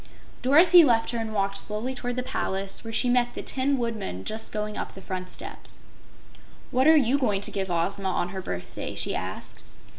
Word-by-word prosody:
Dorothy 330 Hz, +7 st, +7 dB
left 235 Hz, -6 st, +3 dB
her 235 Hz, -, -2 dB
and 225 Hz, -1 st, -3 dB
walked 195 Hz, -1 st, 0 dB
slowly 215 Hz, +6 st, -3 dB
toward 245 Hz, -1 st, -4 dB
the 250 Hz, -, -2 dB
place, 195 Hz, -6 st, -3 dB
where 225 Hz, -, -6 dB
she 245 Hz, -, +1 dB
met 245 Hz, 0 st, +2 dB
the -, -, -5 dB
Tin 270 Hz, +1 st, 0 dB
Woodman 220 Hz, -, -3 dB
just 220 Hz, 0 st, -4 dB
going 210 Hz, -1 st, -3 dB
up -, -, -5 dB
the -, -, -9 dB
front 185 Hz, -1 st, -5 dB
steps. -, -, -7 dB, 0.9 s
"What 260 Hz, +3 st, +3 dB
are 320 Hz, 0 st, +8 dB
you 275 Hz, 0 st, +3 dB
going 205 Hz, -7 st, +1 dB
to -, -, -3 dB
give 195 Hz, -2 st, -2 dB
Ozma 190 Hz, +3 st, 0 dB
on 180 Hz, -1 st, -1 dB
her 190 Hz, 0 st, -5 dB
birthday?" 90 Hz, -, -5 dB
she -, -, -2 dB
asked. -, -, -5 dB
220 Hz, 200 wpm, -26 LUFS, 195-255 Hz, 0.9 s, are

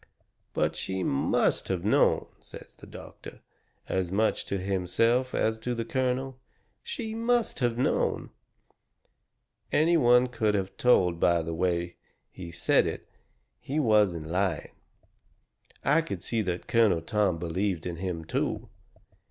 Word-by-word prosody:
"But -, -, +1 dB
she 95 Hz, -1 st, -3 dB
MUST 70 Hz, -, +1 dB
have 95 Hz, -1 st, -2 dB
known," 105 Hz, -, +3 dB
says -, -, -12 dB
the -, -, -15 dB
doctor, -, -, -11 dB, 0.5 s
as 95 Hz, -2 st, -1 dB
much 110 Hz, +3 st, +1 dB
to 100 Hz, -, -2 dB
himself 100 Hz, +7 st, 0 dB
as 110 Hz, 0 st, 0 dB
to 120 Hz, +2 st, -3 dB
the 115 Hz, -1 st, -3 dB
colonel. 130 Hz, +1 st, -2 dB, 0.4 s
"She 240 Hz, -, -5 dB
MUST 230 Hz, +1 st, 0 dB
have 120 Hz, -3 st, 0 dB
known." 125 Hz, -, 0 dB, 1.4 s
Any 165 Hz, +3 st, +4 dB
one 125 Hz, -3 st, +5 dB
could 110 Hz, -4 st, 0 dB
of 95 Hz, -1 st, -2 dB
told 90 Hz, -9 st, +3 dB
by 85 Hz, -1 st, +3 dB
the 80 Hz, +1 st, -4 dB
way 85 Hz, 0 st, -1 dB, 0.3 s
he 90 Hz, -2 st, -9 dB
said 85 Hz, 0 st, +2 dB
it -, -, -5 dB
that -, -, -40 dB, 0.5 s
he 145 Hz, +3 st, -3 dB
wasn't 105 Hz, -, +2 dB
lying. 90 Hz, -1 st, -1 dB, 1.1 s
I 150 Hz, +4 st, +4 dB
could 165 Hz, -, -6 dB
see 115 Hz, -2 st, -1 dB
that 90 Hz, -3 st, -3 dB
Colonel 105 Hz, -8 st, +3 dB
Tom 100 Hz, -3 st, +1 dB
believed 85 Hz, +1 st, -2 dB
in 85 Hz, -2 st, -4 dB
him, 85 Hz, -3 st, -4 dB
too. -, -, -2 dB
105 Hz, 140 wpm, -28 LUFS, 90-125 Hz, 1.4 s, one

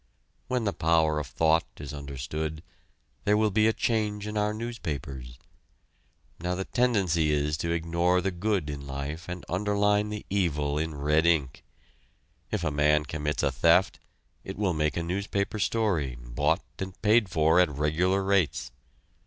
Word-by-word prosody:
When 125 Hz, -2 st, 0 dB
the 100 Hz, -2 st, 0 dB
power 80 Hz, -1 st, +2 dB
of 75 Hz, -, -5 dB
thought 80 Hz, +5 st, +2 dB
is 75 Hz, 0 st, -7 dB
understood, 75 Hz, +3 st, -5 dB, 0.6 s
there 105 Hz, 0 st, +3 dB
will 110 Hz, -1 st, +2 dB
be 110 Hz, +2 st, +3 dB
a -, -, +5 dB
change 105 Hz, -2 st, -1 dB
in 105 Hz, 0 st, -5 dB
our 105 Hz, 0 st, +1 dB
newspapers. 70 Hz, -, -5 dB, 1.0 s
Now 90 Hz, +2 st, -2 dB
the 95 Hz, +1 st, -3 dB
tendency 95 Hz, -11 st, +2 dB
is 75 Hz, 0 st, +1 dB
to 85 Hz, +2 st, -2 dB
ignore 85 Hz, +2 st, +1 dB
the 95 Hz, +2 st, -1 dB
good 95 Hz, -2 st, -1 dB
in 70 Hz, -1 st, -6 dB
life 70 Hz, +5 st, -5 dB
and 90 Hz, 0 st, -6 dB
underline 105 Hz, +2 st, +1 dB
the 105 Hz, -1 st, -6 dB
evil 75 Hz, -7 st, 0 dB
in 80 Hz, -1 st, -3 dB
red 75 Hz, +3 st, +2 dB
ink. 75 Hz, -6 st, +1 dB, 0.9 s
If 105 Hz, -5 st, -2 dB
a 75 Hz, -, 0 dB
man 75 Hz, +1 st, +3 dB
commits 75 Hz, -1 st, -2 dB
a 70 Hz, -, +2 dB
theft, 85 Hz, +8 st, +3 dB, 0.4 s
it 95 Hz, -, -7 dB
will 100 Hz, -4 st, +1 dB
make 75 Hz, -1 st, 0 dB
a 85 Hz, -, -1 dB
newspaper 100 Hz, +4 st, -2 dB
story, 95 Hz, -, 0 dB
bought 70 Hz, +7 st, 0 dB, 0.2 s
and 95 Hz, -1 st, -6 dB
paid 110 Hz, -1 st, +4 dB
for 80 Hz, +1 st, +3 dB
at 90 Hz, -, +5 dB
regular 80 Hz, +7 st, +1 dB
rates. 95 Hz, -5 st, +1 dB
85 Hz, 160 wpm, -27 LUFS, 75-100 Hz, 1.0 s, a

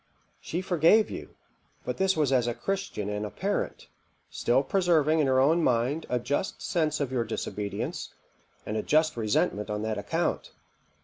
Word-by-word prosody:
She 175 Hz, +3 st, -4 dB
forgave 185 Hz, +4 st, +4 dB
you; -, -, -8 dB, 0.5 s
but -, -, -3 dB
this 190 Hz, -2 st, +2 dB
was 150 Hz, -4 st, +2 dB
as 125 Hz, -2 st, +3 dB
a 120 Hz, -, -1 dB
Christian 155 Hz, -, -3 dB
and 105 Hz, 0 st, -2 dB
a 105 Hz, -, -3 dB
parent; 200 Hz, -, -3 dB, 0.5 s
still -, -, +2 dB
preserving 160 Hz, -5 st, +2 dB
in 150 Hz, -, +3 dB
her 130 Hz, 0 st, +3 dB
own 160 Hz, +5 st, +4 dB
mind 130 Hz, +6 st, +1 dB
a 125 Hz, -, +1 dB
just 140 Hz, +9 st, -2 dB
sense 155 Hz, -4 st, 0 dB
of 140 Hz, -3 st, -2 dB
your 125 Hz, -3 st, +1 dB
disobedience, 105 Hz, -2 st, -4 dB, 0.5 s
and 110 Hz, -, -3 dB
a -, -, 0 dB
just 155 Hz, +5 st, +2 dB
resentment 105 Hz, -2 st, 0 dB
on 105 Hz, 0 st, -2 dB
that 110 Hz, -1 st, -2 dB
account. 100 Hz, -, -2 dB
140 Hz, 170 wpm, -28 LUFS, 115-165 Hz, 0.5 s, forgave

